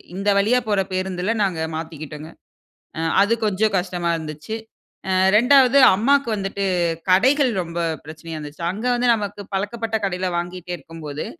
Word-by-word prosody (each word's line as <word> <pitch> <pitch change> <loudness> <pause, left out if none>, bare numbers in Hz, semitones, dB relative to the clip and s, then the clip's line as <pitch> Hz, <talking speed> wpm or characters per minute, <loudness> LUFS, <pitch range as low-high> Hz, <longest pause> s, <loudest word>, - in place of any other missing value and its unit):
இந்த 195 +2 -1
வழியா 225 +5 +3
போற 205 -2 +2
பேருந்துல 185 +2 -2
நாங்க 175 -5 -1
மாத்திக்கிட்டோங்க. 155 -1 -7 0.7
அ, - - -3 0.2
அது 205 +3 +3
கொஞ்சம் 210 +1 +1
கஷ்டமா 175 -1 -2
இருந்துச்சு. 155 +6 -6 0.5
அ, - - +1 0.2
2வது 260 +3 +5 0.2
அம்மாக்கு 275 +4 +2
வந்துட்டு, 195 0 -3 0.4
கடைகள் 255 +8 +4
ரொம்ப 170 0 -6 0.3
பிரச்சனையா 160 +1 -8
இருந்துச்சு. 150 +2 -8
அங்க 215 +6 -6
வந்து 245 0 0
நமக்கு 205 -1 -5
பழக்கப்பட்ட 220 +3 -3
கடையில 185 -1 -2
வாங்கிட்டே 180 0 -5
இருக்கும்போது, 150 -1 -7
190 Hz, 135 wpm, -21 LUFS, 165-220 Hz, 0.7 s, 2வது